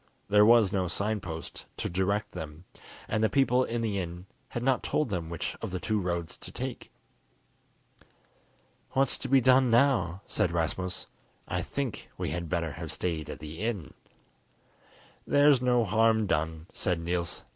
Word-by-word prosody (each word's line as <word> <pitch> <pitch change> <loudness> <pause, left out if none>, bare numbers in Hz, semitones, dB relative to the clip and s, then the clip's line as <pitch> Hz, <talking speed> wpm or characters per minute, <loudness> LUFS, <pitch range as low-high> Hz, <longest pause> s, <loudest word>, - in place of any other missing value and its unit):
There 105 +1 +6
was 115 -4 +6
no 95 -3 0
sign 105 +5 0
post 80 -2 -7
to - - -2
direct 100 +4 0
them, 80 +2 -8 0.4
and 110 - 0
the 110 - +4
people 130 -2 +3
in 115 -1 -2
the 105 -3 0
inn 90 0 -5 0.2
had 120 - -4
not 130 -1 +2
told 150 -5 0
them 85 -5 -3
which 85 -1 -3
of - - -3
the 95 0 -3
two 105 +6 0
roads 85 -2 -3
to - - -9
take. - - -6 2.0
"What's 135 -1 +3
to - - -4
be 135 0 +5
done 130 0 +5
now?" 115 - +3
said 85 - 0
Rasmus. 85 +1 -1 0.4
"I - - -1
think 140 -5 -4
we - - -2
had 85 -2 -4
better 85 -3 -1
have 80 +1 -6
stayed 80 -2 -2
at - - -5
the 75 +2 -8
inn." 105 -6 -3 1.3
"There's 145 -2 +5
no 125 -2 +3
harm 110 +1 +3
done," 80 -3 -1
said 90 -2 0
Niels. 85 0 -2
95 Hz, 165 wpm, -29 LUFS, 85-115 Hz, 2.0 s, There